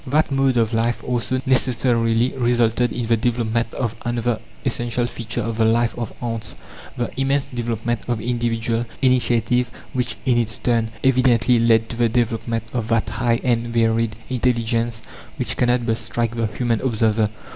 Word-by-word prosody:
That 145 Hz, +3 st, +2 dB
mode 135 Hz, -2 st, +2 dB
of 115 Hz, 0 st, +2 dB
life 115 Hz, +1 st, 0 dB
also 125 Hz, +1 st, -1 dB
necessarily 120 Hz, -2 st, +2 dB
resulted 120 Hz, -1 st, +2 dB
in 120 Hz, -, -3 dB
the 115 Hz, +1 st, +3 dB
development 115 Hz, 0 st, 0 dB
of 120 Hz, -4 st, -1 dB
another 120 Hz, -1 st, -1 dB, 0.3 s
essential 120 Hz, -1 st, -1 dB
feature 115 Hz, -1 st, -4 dB
of 115 Hz, 0 st, -3 dB
the 115 Hz, -, +3 dB
life 115 Hz, +1 st, +2 dB
of 120 Hz, -2 st, -4 dB
ants: 115 Hz, -2 st, -3 dB, 0.4 s
the 120 Hz, -1 st, -2 dB
immense 135 Hz, +1 st, +1 dB
development 120 Hz, -1 st, -2 dB
of 120 Hz, -2 st, -1 dB
individual 115 Hz, 0 st, -1 dB, 0.2 s
initiative 125 Hz, -1 st, +2 dB, 0.2 s
which, 125 Hz, -1 st, -1 dB
in 120 Hz, -2 st, +3 dB
its 110 Hz, -2 st, -1 dB
turn, 115 Hz, -2 st, +1 dB
evidently 125 Hz, -2 st, +4 dB
led 115 Hz, -1 st, +4 dB
to 115 Hz, -, -6 dB
the 120 Hz, -1 st, +3 dB
development 115 Hz, -1 st, 0 dB
of 115 Hz, -3 st, -2 dB
that 115 Hz, -1 st, +1 dB
high 115 Hz, -1 st, +1 dB
and 120 Hz, -2 st, +1 dB
varied 115 Hz, -1 st, +1 dB
intelligence 115 Hz, -2 st, 0 dB, 0.3 s
which -, -, -2 dB
cannot 120 Hz, -1 st, +2 dB
but 115 Hz, -1 st, +1 dB
strike 115 Hz, +1 st, -2 dB
the 115 Hz, -1 st, 0 dB
human 115 Hz, +1 st, -1 dB
observer. 110 Hz, -3 st, +1 dB
120 Hz, 160 wpm, -21 LUFS, 115-125 Hz, 0.4 s, evidently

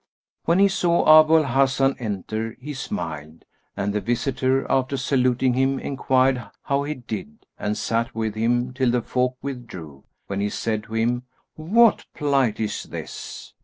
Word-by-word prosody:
When 170 Hz, -, +3 dB
he 200 Hz, +1 st, +6 dB
saw 170 Hz, -4 st, +5 dB
Abu 155 Hz, +1 st, +4 dB
al 155 Hz, -, +3 dB
Hasan 135 Hz, 0 st, +2 dB
enter 110 Hz, +1 st, -4 dB
he 145 Hz, +3 st, -6 dB
smiled, 80 Hz, -, -6 dB, 0.3 s
and 100 Hz, 0 st, -1 dB
the 105 Hz, -, -1 dB
visitor, 130 Hz, +3 st, 0 dB
after 135 Hz, +1 st, 0 dB
saluting 130 Hz, -1 st, +1 dB
him, 135 Hz, +2 st, +1 dB
enquired 130 Hz, -2 st, +1 dB, 0.2 s
how 140 Hz, -1 st, 0 dB
he 150 Hz, +2 st, -3 dB
did 130 Hz, -, -8 dB
and 105 Hz, 0 st, -2 dB
sat 115 Hz, 0 st, -1 dB
with 110 Hz, -1 st, -2 dB
him 120 Hz, +3 st, 0 dB
till 130 Hz, -1 st, +1 dB
the 120 Hz, -1 st, +1 dB
folk 125 Hz, 0 st, -1 dB
withdrew, 90 Hz, -, -8 dB, 0.2 s
when 100 Hz, 0 st, -4 dB
he 100 Hz, +1 st, 0 dB
said 110 Hz, 0 st, -2 dB
to 110 Hz, -, -7 dB
him, 120 Hz, +2 st, 0 dB, 0.3 s
"What 215 Hz, +9 st, +3 dB
plight 135 Hz, -6 st, +1 dB
is 110 Hz, -1 st, -2 dB
this?" -, -, -8 dB
125 Hz, 160 wpm, -23 LUFS, 110-135 Hz, 0.3 s, he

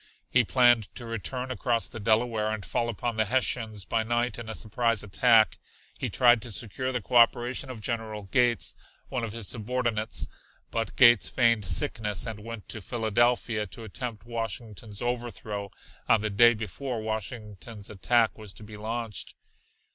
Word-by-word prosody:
He 125 Hz, -, +5 dB
planned 120 Hz, -2 st, +4 dB
to 120 Hz, -, -6 dB
return 125 Hz, +3 st, -4 dB
across 120 Hz, -2 st, 0 dB
the 115 Hz, -, -8 dB
Delaware 110 Hz, 0 st, +1 dB
and 110 Hz, -2 st, -4 dB
fall 120 Hz, 0 st, -1 dB
upon 115 Hz, +1 st, -3 dB
the 110 Hz, -, +3 dB
Hessians 110 Hz, -3 st, -1 dB
by 115 Hz, -, 0 dB
night 120 Hz, +2 st, -1 dB
in 115 Hz, -2 st, -7 dB
a 110 Hz, -, -4 dB
surprise 115 Hz, 0 st, 0 dB
attack. 110 Hz, +2 st, +4 dB, 0.4 s
He -, -, -2 dB
tried 120 Hz, -2 st, +5 dB
to 120 Hz, -, -5 dB
secure 125 Hz, +4 st, -2 dB
the 125 Hz, -4 st, -3 dB
cooperation 120 Hz, +2 st, +3 dB
of 120 Hz, -4 st, -7 dB
General 110 Hz, -2 st, -3 dB
Gates, 120 Hz, +3 st, +1 dB, 0.4 s
one 125 Hz, -2 st, -2 dB
of 115 Hz, -, -3 dB
his 115 Hz, -2 st, -2 dB
subordinates, 115 Hz, -1 st, -1 dB, 0.4 s
but 115 Hz, -1 st, -2 dB
Gates 120 Hz, -4 st, +6 dB
feigned 115 Hz, -5 st, +3 dB
sickness 105 Hz, +4 st, +1 dB
and 110 Hz, -3 st, -5 dB
went 115 Hz, 0 st, -8 dB
to 110 Hz, -, -6 dB
Philadelphia 115 Hz, 0 st, +1 dB
to 115 Hz, +5 st, -10 dB
attempt 110 Hz, 0 st, -5 dB
Washington's 115 Hz, -2 st, -5 dB
overthrow 115 Hz, -4 st, -3 dB, 0.4 s
on 110 Hz, -, +5 dB
the 110 Hz, 0 st, -1 dB
day 120 Hz, +3 st, +6 dB
before 115 Hz, +4 st, -4 dB
Washington's 110 Hz, -1 st, -6 dB
attack 110 Hz, +3 st, +2 dB
was 105 Hz, -3 st, -9 dB
to -, -, -10 dB
be 105 Hz, 0 st, -10 dB
launched. 110 Hz, 0 st, -4 dB
115 Hz, 160 wpm, -28 LUFS, 105-120 Hz, 0.4 s, Gates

